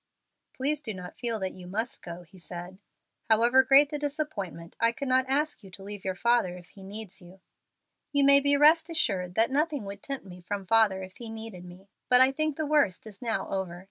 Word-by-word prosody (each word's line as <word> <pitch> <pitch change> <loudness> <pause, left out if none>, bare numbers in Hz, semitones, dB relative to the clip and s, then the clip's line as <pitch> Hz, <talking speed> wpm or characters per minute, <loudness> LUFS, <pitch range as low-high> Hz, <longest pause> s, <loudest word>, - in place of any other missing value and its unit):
"Please 290 +3 0
do 220 -8 -5
not 180 -1 -9
feel 235 -2 -1
that 190 -1 -3
you 180 -1 -11
must 225 +6 -3
go," 170 +1 -8
he 185 +2 -18
said. 175 +2 -8 0.5
"However 235 +4 +5
great 275 +2 +5
the 295 - -3
disappointment, 275 - -4
I 230 0 +4
could 275 +4 -6
not 260 0 +2
ask 295 0 0
you 195 - -12
to 190 +1 -11
leave 205 0 -8
your 190 -1 -2
father 235 -4 +1
if 180 -1 -15
he 195 - -16
needs 195 0 -6
you." 180 +2 -15 0.7
"You 285 -1 +3
may 280 0 +7 0.2
rest 315 +4 +5
assured 185 - +1
that 225 +3 +3
nothing 290 -4 0
would 200 0 -8
tempt 275 -6 -6
me 180 -1 -11
from 195 +2 -5
father 205 -2 +3
if 185 0 -11
he 235 -3 -8
needed 220 -5 -8
me. 180 +2 -14 0.2
But 250 0 +8
I 260 +1 +6
think 310 +1 -1
the 315 - -1
worst 290 -12 +2
is 205 -2 -11
now 230 -2 -2
over. 185 -3 -3
220 Hz, 215 wpm, -28 LUFS, 185-270 Hz, 0.7 s, But